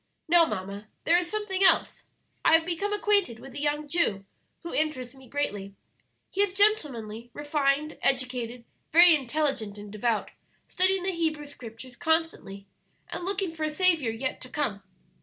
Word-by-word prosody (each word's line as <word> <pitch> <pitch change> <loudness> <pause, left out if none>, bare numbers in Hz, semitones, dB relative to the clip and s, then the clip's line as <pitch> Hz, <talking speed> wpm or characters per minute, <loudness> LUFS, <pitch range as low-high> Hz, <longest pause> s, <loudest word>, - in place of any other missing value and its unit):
"Now, 335 0 +6
mamma, 200 -3 -5 0.2
there 335 - +4
is 350 -1 -4
something 390 -1 -1
else. - - +3 0.4
I - - +5
have 325 0 +3
become 360 +4 -2
acquainted 405 - +2
with 270 - -12
a 285 - -6
young 295 0 -1
Jew 280 - 0 0.4
who 335 - -6
interests 275 -5 -1
me 265 -2 -16
greatly. 205 -9 -3 0.6
He 395 - 0
is 395 -2 0
gentlemanly, 250 - 0
refined, 290 0 -1
educated, 250 -3 -1 0.3
very 340 +2 +8
intelligent 270 -6 -1
and 205 0 -10
devout, 215 +1 -1 0.3
studying 375 0 +2
the 380 - 0
Hebrew 320 -4 -1
Scriptures 245 -2 -11
constantly, 320 -11 -1 0.4
and - - -5
looking 390 -2 -2
for 325 -1 -6
a 310 - +1
Saviour 320 -6 +3
yet 260 +4 -4
to 255 - -10
come. 240 -10 -2
295 Hz, 160 wpm, -27 LUFS, 235-340 Hz, 0.6 s, very